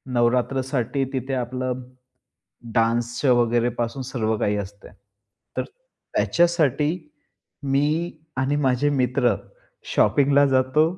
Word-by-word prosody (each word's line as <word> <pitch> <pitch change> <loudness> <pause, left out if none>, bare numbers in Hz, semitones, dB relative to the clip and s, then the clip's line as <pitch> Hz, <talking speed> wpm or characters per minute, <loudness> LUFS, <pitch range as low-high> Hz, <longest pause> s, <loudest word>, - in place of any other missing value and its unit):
नवरात्रसाठी 125 +2 +1
तिथे 130 +1 -3
आपलं 130 0 -2 0.9
डान्सच्या 120 +3 +2
वगैरेपासून 120 +1 +1
सर्व 120 -4 -1
काही 105 0 +1
असतंय. 100 +1 -7 0.6
तर - - 0 0.5
त्याच्यासाठी 165 -4 +2 0.8
मी 150 +5 +1 0.2
आणि 135 +2 +1
माझे 130 +3 +2
मित्र 125 -3 +2 0.6
शॉपिंगला 140 0 +4
जातो 130 +3 +3
130 Hz, 85 wpm, -23 LUFS, 120-140 Hz, 0.9 s, शॉपिंगला